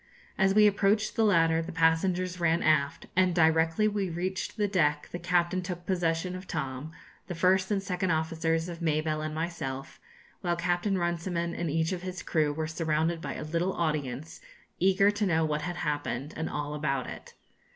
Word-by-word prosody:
As 195 0 +2
we 210 0 +7
approached 210 +1 +2
the 225 - +2
ladder 165 -5 +4
the 165 +2 -6
passengers 180 +2 +1
ran 170 0 +2
aft, 145 -3 +2
and 185 -1 +3
directly 160 +4 +3
we 205 -3 -1
reached 185 +5 -3
the 210 -1 +2
deck 150 -6 +1
the 175 - -4
captain 175 +1 +1
took 175 -1 -6
possession 175 -1 0
of 185 +1 -8
Tom, 135 +2 -4 0.4
the 175 - -5
first 185 +2 +3
and 200 -2 0
second 185 -1 -1
officers 160 +1 0
of 170 -1 -7
Mabelle 155 -1 0
and 155 0 -4
myself, 155 -5 -4 0.4
while 175 -1 0
Captain 175 +3 0
Runciman 170 0 -1
and 170 -1 -2
each 160 +3 0
of 180 -2 -3
his 185 -1 -6
crew 155 -3 +1
were 155 +2 -2
surrounded 160 +1 -1
by 140 -2 -4
a - - -5
little 170 +4 -1
audience 150 -3 -3 0.4
eager 195 +2 +4
to 205 0 -1
know 160 -2 +2
what 150 -1 -1
had 175 +3 -4
happened, 150 -2 -3
and 160 0 -3
all 150 0 -3
about 135 -3 -1
it. - - -9
170 Hz, 185 wpm, -29 LUFS, 155-185 Hz, 0.4 s, we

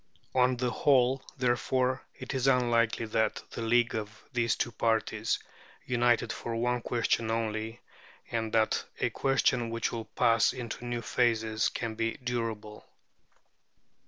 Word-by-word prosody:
On 125 0 +3
the 125 0 0
whole, 130 -1 +3 0.2
therefore, 130 +1 +1
it 130 - -6
is 130 0 0
unlikely 120 -3 +2
that 110 0 0
the - - -5
league 120 +1 +2
of 105 -1 -5
these 115 -2 +2
two 120 - -1
parties, 110 -1 0 0.5
united 120 -2 +2
for 115 - -4
one 125 +1 0
question 115 -1 0
only, 110 0 -2 0.5
and 115 -1 -1
that 110 -1 +2 0.2
a - - +1
question 130 -3 +1
which 115 0 -1
will 115 -2 -4
pass 115 -2 +3
into 120 -1 -6
new 120 -1 -3
phases, 110 -2 +1
can 115 -2 -4
be 115 +1 -1
durable. 115 -4 -4
115 Hz, 135 wpm, -30 LUFS, 110-125 Hz, 0.5 s, On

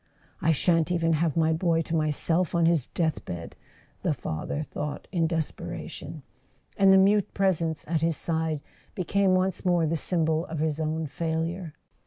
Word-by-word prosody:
"I 165 - +3
shan't 165 +2 +2
even 165 -2 +2
have 160 0 +1
my 160 0 +3
boy 165 0 +1
to 165 - -3
myself 160 +3 +1
on 170 -1 +3
his 165 -6 +2
death¬ 160 -3 0
bed," 85 -1 -7 0.5
the - - 0
father 80 - -3
thought 150 -1 -5
in 165 -3 +1
desperation; 160 -1 -5 0.5
and 195 -1 +5
the 190 - +8
mute 200 +1 +3
presence 170 -5 0
at 160 -1 0
his 165 -2 +1
side 160 -2 -1 0.3
became 190 +1 +2
once 185 0 0
more 175 -3 +3
the 160 +1 0
symbol 160 0 0
of 160 - -5
his 155 0 -1
own 160 0 -1
failure. 165 +2 -3
165 Hz, 165 wpm, -27 LUFS, 155-175 Hz, 0.5 s, the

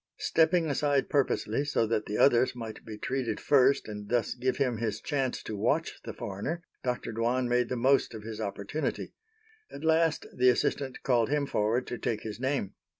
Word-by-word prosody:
Stepping 165 +1 +3
aside 145 -1 +1
purposely 140 0 +1
so 145 -5 +1
that 110 -1 -1
the 105 - -2
others 125 -2 +4
might 115 -2 -7
be 110 -1 -8
treated 125 -2 -2
first 135 -1 +4
and 105 -1 -7
thus 120 -1 +1
give 130 0 -1
him 125 -4 +1
his 110 -2 -2
chance 135 -4 -2
to 110 - -5
watch 140 +11 0
the - - -4
foreigner, 120 - -4 0.2
Dr. 125 -2 -2
Dwan 120 +3 0
made 125 0 +1
the 125 - -1
most 130 0 +2
of 110 - -8
his 110 0 -6
opportunity. 100 +8 -3 0.6
At 140 - -9
last 160 0 +2
the 125 0 +5
assistant 130 +2 0
called 120 -4 +2
him 145 0 +1
forward 115 0 0
to 120 - -5
take 110 -2 -2
his 110 0 -6
name. 130 -6 -1
125 Hz, 185 wpm, -29 LUFS, 110-140 Hz, 0.6 s, the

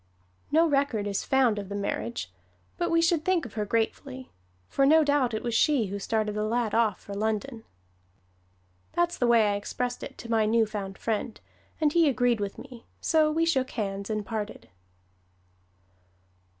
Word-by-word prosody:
No 325 +3 +5
record 275 -8 +1
is 200 -1 -2
found 255 -6 +2
of 200 -2 -7
the 200 - -4
marriage. 115 - -3 0.4
But 345 - -1
we 330 0 +3
should 335 -2 +2
think 360 -3 +1
of 235 - -9
her 215 -1 -2
gratefully, 255 +4 -2 0.4
for 275 - +1
no 315 +3 +6
doubt 285 -5 +1
it 215 - -4
was 240 -1 -2
she 270 0 +3
who 200 +1 -5
started 215 +1 -1
the 210 0 -1
lad 225 0 0
off 220 -4 +2
for 200 - -8
London. 220 +3 -2 1.3
That's 345 0 +1
the 245 - +1
way 230 -3 +5
I - - 0
expressed 245 +4 -4
it - - -8
to 235 - -8
my 220 -2 +3
new 225 +1 +3
found 200 -2 -6
friend, 225 0 -3 0.4
and 305 -2 +2
he 335 -3 +5
agreed 245 -3 +2
with 200 -1 -4
me, 250 -3 -12
so 315 -1 +3
we 325 +2 +1
shook 265 -6 +1
hands 200 -3 -4
and 215 -1 -2
parted. 215 -1 -5
230 Hz, 175 wpm, -27 LUFS, 210-275 Hz, 1.3 s, no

